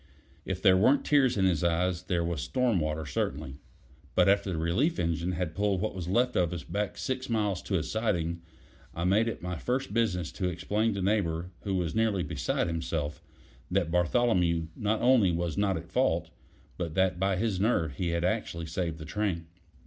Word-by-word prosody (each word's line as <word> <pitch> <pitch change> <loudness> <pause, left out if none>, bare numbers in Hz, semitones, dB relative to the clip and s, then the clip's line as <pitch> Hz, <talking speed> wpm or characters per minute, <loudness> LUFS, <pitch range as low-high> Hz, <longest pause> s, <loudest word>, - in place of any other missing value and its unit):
If 95 -1 -4
there 95 -3 +7
weren't 130 +9 +4
tears 135 -6 +3
in 95 - +3
his 85 -3 +2
eyes, 85 +1 +1
there 90 -2 -1
was 85 -3 -2
storm 125 -7 +1
water 75 0 -2
certainly. 65 -1 -3 0.6
But 90 0 +5
after 100 0 +3
the 85 - -2
relief 95 - +1
engine 85 +1 -1
had 85 -2 -2
pulled 100 0 +1
what 110 +3 -2
was 90 -3 -5
left 125 +7 +2
of 85 -3 +2
us 85 - -5
back 105 0 -3
six 130 0 -3
miles 105 -5 0
to 95 - -1
a 80 - -1
siding, 85 -3 -1 0.5
I 85 - -2
made 100 +6 +3
it 115 - -4
my 90 -1 -3
first 125 -4 -2
business 95 -8 0
to 90 - -2
explain 105 +6 0
to 95 - -2
Neighbor, 90 -4 0
who 100 -2 0
was 90 -3 -1
nearly 110 -4 +1
beside 75 - -1
himself, 80 -3 -3 0.5
that 90 -3 0
Bartholomew 90 -3 +2
not 110 +1 -1
only 120 -7 +5
was 85 -1 -2
not 100 -2 +1
at 85 +3 -9
fault, 85 -9 +1 0.5
but 85 -3 -3
that 95 -2 +2
by 95 0 +2
his 100 -1 -1
nerve 85 - +1
he 90 -2 -1
had 85 0 -1
actually 90 -4 -1
saved 80 0 -3
the 80 - -8
train. 90 -1 -2
90 Hz, 195 wpm, -29 LUFS, 85-105 Hz, 0.6 s, there